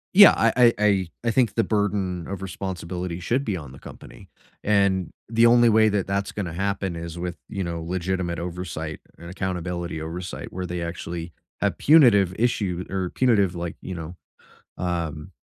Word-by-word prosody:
Yeah, 200 0 +10
I 115 0 +3
I 120 -2 +6
I 100 -3 +3 0.2
I 115 - +3
think 120 -2 +2
the 115 - +3
burden 100 -5 -1
of 95 -1 -5
responsibility 90 -2 -5
should 120 +10 0
be 105 -8 -2
on 75 -6 -9
the 65 - -13
company, - - -13 0.3
and 100 -3 +2 0.2
the 115 +1 +4
only 120 0 +6
way 110 0 +5
that 100 -2 0
that's 100 0 -2
gonna 90 -6 -4
happen 95 0 -2
is 85 0 -6
with, 90 0 -4
you 100 -2 -3
know, 85 -1 -4
legitimate 90 0 -2
oversight 85 -3 -5 0.2
and 85 - -11
accountability 90 -3 -3
oversight 85 +2 -6
where 90 0 -4
they 90 0 -3
actually 85 0 -5 0.3
have - - 0
punitive 115 - +6
issue 100 -6 0
or 95 -2 -1
punitive, 100 -8 +2
like, 85 0 -4
you 95 - -6
know, 85 +1 -7 0.6
um, 85 -4 -3
95 Hz, 170 wpm, -24 LUFS, 85-105 Hz, 0.6 s, Yeah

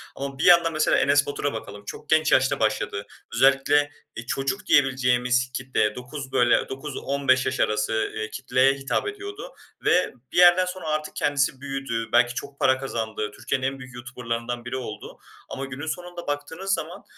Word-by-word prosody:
ama 135 0 -5
bir - - -1
yandan 170 -2 +6
mesela 155 0 +3
Enes 140 +1 +4
Batur'a 145 -1 -2
bakalım. 105 -2 -8
Çok 145 - -9
genç 155 0 +3
yaşta 130 0 +3
başladı. 105 -2 -1 0.3
Özellikle, 135 +4 +4 0.3
eee, 115 - -7
çocuk 135 +11 -2
diyebileceğimiz 125 -2 +2
kitleye 125 -6 0
9, 130 +2 -7
böyle, 120 -1 +3
9-15 135 -1 0
yaş 130 - -2
arası, 105 +1 0
eee, 110 0 -3
kitleye 130 +2 +2
hitap 135 - -2
ediyordu 410 +4 -7 0.3
ve 180 - +3 0.2
bir - - -5
yerden 180 +1 +7
sonra 180 -3 -6
artık 155 0 -2
kendisi 135 -2 0
büyüdü. 135 -5 -3
Belki 120 0 +4
çok 140 +1 -7
para 130 0 +4
kazandı. 110 -5 -3
Türkiye'nin 130 0 -2
en 135 0 -4
büyük 130 -2 -11
YouTuber'larından 120 -1 -5
biri 130 +2 -3
oldu 130 - -8 0.3
ama 135 0 -4
günün 135 +4 -7
sonunda 175 0 -6
baktığınız 160 +7 -2
zaman, 180 +2 -4
135 Hz, 165 wpm, -25 LUFS, 125-150 Hz, 0.3 s, yerden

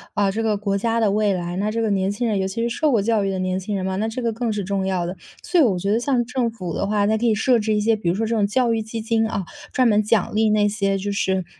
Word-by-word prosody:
啊， 200 -1 +2
这 220 - -2
个 220 -2 +1
国 200 -1 -1
家 230 +3 0
的 215 -3 +2
未 210 0 +2
来， 175 -1 -3
那 205 +2 0
这 225 +2 -2
个 220 - 0
年 190 -1 +1
轻 235 +4 -2
人 210 -3 0
尤 190 - 0
其 210 +5 -3
是 235 - 0
受 310 - +2
过 240 -6 +3
教 215 0 +1
育 195 - 0
的 190 - -2
年 185 0 -1
轻 200 +2 -4
人 190 -1 -2
嘛， 190 0 -2
那 215 +3 -1
这 235 +3 -4
个 230 -1 0
更 230 0 -2
是 210 -1 -2
重 195 0 -2
要 185 -2 -1
的， 180 +2 -4 0.3
所 355 - +2
以 - - +6
我 205 -8 +2
觉 195 +3 -1
得 220 - +2
像 245 -1 0
政 250 -1 -1
府 185 -7 -6
的 200 - -2
话， 205 0 +1
它 215 +2 +2
可 230 +2 0
以 220 - +3
设 240 +3 +3
置 215 0 0
一 - - +1
些 220 +2 +2
比 205 -5 -2
如 175 - +1
说 225 +3 -1
这 225 - -1
种 205 -2 +2
教 235 +2 +1
育 225 - 0
基 220 +1 -6
金 225 0 +1
啊， 195 -4 -3 0.3
专 255 -1 +3
门 210 -2 +4
奖 215 -2 +1
励 220 +1 +2
那 210 -1 +3
些 200 -1 0
就 200 +1 -3
是 190 -2 0
210 Hz, 355 characters per minute, -22 LUFS, 195-225 Hz, 0.3 s, 以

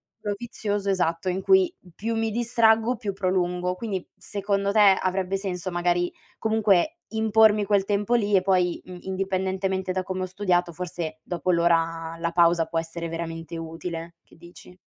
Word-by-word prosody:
circolo 205 -1 -4
vizioso 205 -4 -3
esatto 180 -1 0
in 185 +1 -1
cui 380 -2 +4 0.2
più 225 +2 -2
mi 225 -1 0
distraggo, 230 0 +3
più 210 -4 -4
prolungo. 180 -1 0
Quindi 190 -2 -4
secondo 200 -1 -1
te 205 -3 +6
avrebbe 190 +1 -1
senso 185 -2 -4
magari 175 0 0 0.3
comunque 220 - +2
impormi 220 -1 +4
quel 200 -1 +2
tempo 205 +3 +1
lì 210 -3 +2
e 185 - +5
poi 180 -2 +1
i 180 0 -11
indipendentemente 190 0 -1
da 185 - -1
come 185 0 -3
ho - - 0
studiato 180 -2 0
forse 165 -2 -5
dopo 180 +1 -1
l'ora 165 -1 +1
la 170 0 -2
pausa 170 -1 +4
può 165 - -1
essere 165 0 -5
veramente 165 0 -5
utile, 165 +1 -6
che - - -21
dici? 175 +1 -15
185 Hz, 160 wpm, -25 LUFS, 175-205 Hz, 0.3 s, te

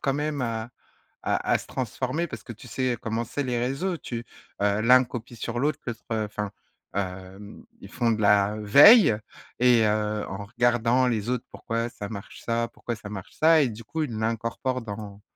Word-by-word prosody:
quand 135 -1 0
même, 150 0 -2
heu, - - +1
à 115 0 -3 0.5
à - - 0
à - - +4
se - - -10
transformer, 130 +6 -2
parce 115 -5 -8
que 120 - -8
tu 120 +3 -14
sais 130 0 -1
comment 115 +1 -2
c'est 145 +5 -3
les 125 -2 -1
réseaux, 135 +9 -1
tu 120 -5 -6 0.4
l'un 110 +5 +5
copie 120 -1 -8
sur 115 +2 -4
l'autre, 150 +4 0 0.3
enfin, 105 -2 -2 0.4
heu, - - +2
hem, 95 +2 -7 0.2
ils 100 - -11
font 120 -2 +1
de 110 -1 -1
la 105 0 +4
veille 140 - +8 0.4
et 120 -2 +5
heu, 105 0 0
en 100 +2 -6
regardant 120 +3 +2
les 115 -2 -1
autres 125 -1 -1
pourquoi 115 0 -3
ça 100 -3 -7
marche 100 -3 -9
ça, 115 0 0
pourquoi 120 - -5
ça 105 -1 -10
marche 95 -3 -8
ça 160 0 +6
et 135 - +2
du 115 +1 -9
coup 160 +9 -4
ils 145 - -4
l'incorporent 115 +3 -2
dans 105 -2 -8
115 Hz, 190 wpm, -26 LUFS, 105-125 Hz, 0.5 s, veille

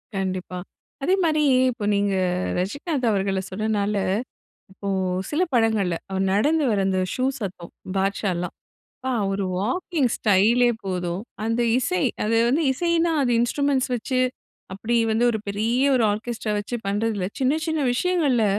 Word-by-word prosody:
கண்டிப்பா. 185 -1 -3 0.4
அதே 370 +6 +3
மாரி 310 -2 +2 0.3
இப்ப 220 -4 -5
நீங்க 200 -1 +1 0.4
ரஜினிகாந்த் 255 - -1
அவர்கள 195 -1 0
சொன்னனால, 210 +1 -1 0.8
இப்போ 200 +1 -6 0.4
சில 310 +5 +1
படங்கள்ல 215 -7 +2
அவர் 190 0 0
நடந்து 295 +9 +2
வர்ற 205 -2 +1
அந்த 185 -1 +1
ஷூ 255 - -1 0.2
சத்தம். 180 -4 -6 0.2
பாட்ஷாலாம். 190 -2 -1 0.5
ப்பா, 260 0 -1
அவரு 195 0 -1 0.2
வாக்கிங் 295 - 0
ஸ்டைலே 220 +4 +4 0.2
போதும். 180 0 -2 0.2
அந்த 230 +2 0 0.2
இசை 180 -8 0 0.2
அது 225 +1 +1
வந்து 300 +6 +2
இசைன்னா, 335 +2 +1
அது 245 - +1
இன்ஸ்ட்ரூமென்ட்ஸ் 265 +1 +1
வச்சு 255 +2 -1 0.5
அப்படி 220 +5 -2 0.2
வந்து 225 +2 +2
ஒரு 220 - -1
பெரிய 225 +5 0
ஒரு 240 -3 +3
ஆர்கெஸ்ட்ரா 220 0 -3
வச்சு 205 +4 -3
பண்றது 210 +3 0
இல்ல. 180 -2 -1
சின்ன 265 +3 +3
சின்ன 320 -1 0
விஷயங்கள்ல 290 -8 +2
220 Hz, 140 wpm, -23 LUFS, 195-260 Hz, 0.8 s, ஸ்டைலே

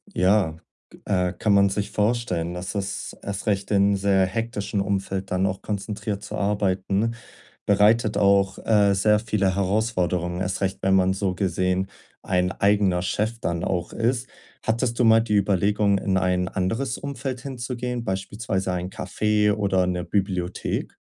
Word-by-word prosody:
Ja, 90 -4 +2 0.5
äh, 90 -2 +1
kann 105 +3 +1
man 100 0 +5
sich 100 +1 -3
vorstellen, 105 -6 0
dass 90 +3 -5
es 100 -1 -3
erst 100 -1 -5
recht, 100 -1 0
in 100 0 +4
sehr 95 -1 +3
hektischen 105 -1 -2
Umfeld 95 -1 -2
dann 90 +1 +1
auch 95 0 -2
konzentriert 105 0 -4
zu - - -6
arbeiten, 100 +2 0 0.5
bereitet 105 +2 +4
auch, 100 -1 +3
äh, 105 -3 +4
sehr 105 +2 +3
viele 100 -4 0
Herausforderungen. 90 -3 0
Erst 95 +2 -2
recht, 95 0 -1
wenn 95 0 +3
man 95 0 +3
so 95 -2 -1
gesehen 95 0 0 0.4
ein 90 0 +1
eigener 100 -3 +2
Chef 110 +5 -1
dann 85 0 -2
auch 90 -2 -2
ist. 120 +2 0 0.4
Hattest 115 +1 0
du - - +4
mal 115 0 +7
die 105 -2 -1
Überlegung, 100 +1 +2
in 95 -1 0
ein 90 0 +1
anderes 115 +7 -1
Umfeld 135 -3 -5
hinzugehen, 125 -2 -4
beispielsweise 95 0 -2
ein 90 +1 -3
Cafe 105 +1 +1
oder 95 -3 +2
'ne 90 -1 -1
Bibliothek? 95 -3 -2
100 Hz, 150 wpm, -24 LUFS, 95-105 Hz, 0.5 s, mal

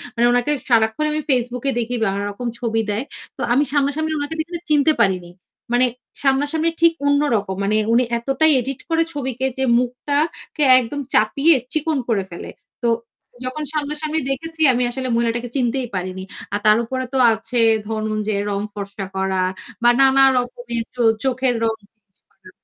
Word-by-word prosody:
মানে 235 +1 +3
উনাকে 245 +4 +2 0.2
সারাক্ষণ 225 +5 +2
আমি 305 - -1
Facebook 250 -1 0 0.2
দেখি 240 +1 -2
বা 195 - +2 0.2
রকম 240 +4 -5
ছবি 225 -2 0
দেয়। 210 +5 -1 0.3
তো - - -7
আমি 280 +4 +4
সামনাসামনি 290 +2 0
ওনাকে 290 +2 -3 0.4
চিনতে 300 +1 +4
পারিনি। 180 -3 +1 0.4
মানে 250 +1 +5 0.4
সামনাসামনি 290 +4 +1
ঠিক 335 0 +6
অন্য 285 0 +3
রকম। 195 -2 -2
মানে 210 +2 +1 0.2
উনি 250 +2 +4
এতটাই 270 +6 +2
এডিট 265 +1 -4
করে 330 0 +3
ছবিকে 265 -2 -3
যে 265 - 0 0.2
মুখটাকে 285 +5 -2 0.2
একদম 270 +4 -4
চাপিয়ে 280 +9 +4 0.2
চিকন 310 -1 0
করে 200 -4 +1
ফেলে। 170 - -8 0.3
তো - - +2 0.6
যখন 300 +4 -3
সামনাসামনি 305 +1 -2
দেখেছি 325 +4 -5
আমি 250 +1 +1
আসলে 260 0 -4
মহিলাটাকে 235 +1 -1
চিনতেই 250 0 0
পারিনি। 185 +1 -4 0.3
আর 205 - 0
তার 215 +1 +6
উপরে 260 +2 -3
তো - - +1 0.2
আছে 230 +2 -2 0.3
ধরুন 215 -1 -2
যে 215 - 0 0.2
রং 200 0 -1
ফর্সা 200 -1 -6
করা 190 -1 0 0.4
বা 240 - +7
নানা 270 0 +6
রকমের 245 -1 -3 0.4
চোখের 260 -1 +1
রং 225 -1 +2
চেঞ্জ 205 -2 -39
করা। - - -19
250 Hz, 160 wpm, -20 LUFS, 220-285 Hz, 0.6 s, বা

